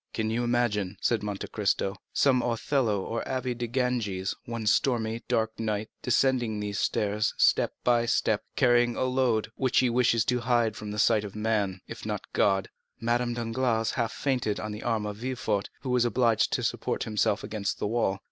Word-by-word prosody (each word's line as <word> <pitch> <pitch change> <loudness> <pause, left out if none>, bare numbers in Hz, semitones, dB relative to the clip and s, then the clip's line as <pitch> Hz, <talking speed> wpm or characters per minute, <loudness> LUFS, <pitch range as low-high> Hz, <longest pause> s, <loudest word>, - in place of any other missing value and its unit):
"Can 110 -1 -1
you 120 +2 0
imagine," 110 -5 0
said 115 -2 +1
Monte 105 -2 -4
Cristo, 100 -1 0 0.2
"some 130 -3 +3
Othello 115 -3 0
or 115 0 -3
Abbé 130 -1 -2
de 120 0 -3
Ganges, 115 -7 -1
one 115 -3 -4
stormy, 110 +1 +1
dark 110 0 0
night, 110 -1 -2
descending 120 -3 +1
these 105 -1 -3
stairs 105 +1 0
step - - +3
by 120 -1 +3
step, 110 -2 +1
carrying 120 -2 +3
a - - -1
load, 125 -4 +1
which 130 -1 0
he 125 -2 +4
wishes 115 -2 +3
to 125 +1 +1
hide 120 -3 +1
from 105 - -7
the 105 - -5
sight 105 0 +3
of 100 -1 -8
man, 105 -4 -1
if - - -8
not - - -3
from - - -21
God?" 95 -1 +2 0.3
Madame 120 +1 0
Danglars 115 -1 0
half 115 -3 -1
fainted 125 -7 -1
on 105 - -4
the 105 +1 -6
arm 115 -3 -1
of 105 -1 -5
Villefort, 110 -4 -2
who 130 - -3
was 125 -1 +3
obliged 120 -1 +2
to - - 0
support - - -1
himself 105 -1 0
against 100 -3 -3
the - - -3
wall. 105 -3 0
115 Hz, 185 wpm, -28 LUFS, 105-120 Hz, 0.3 s, he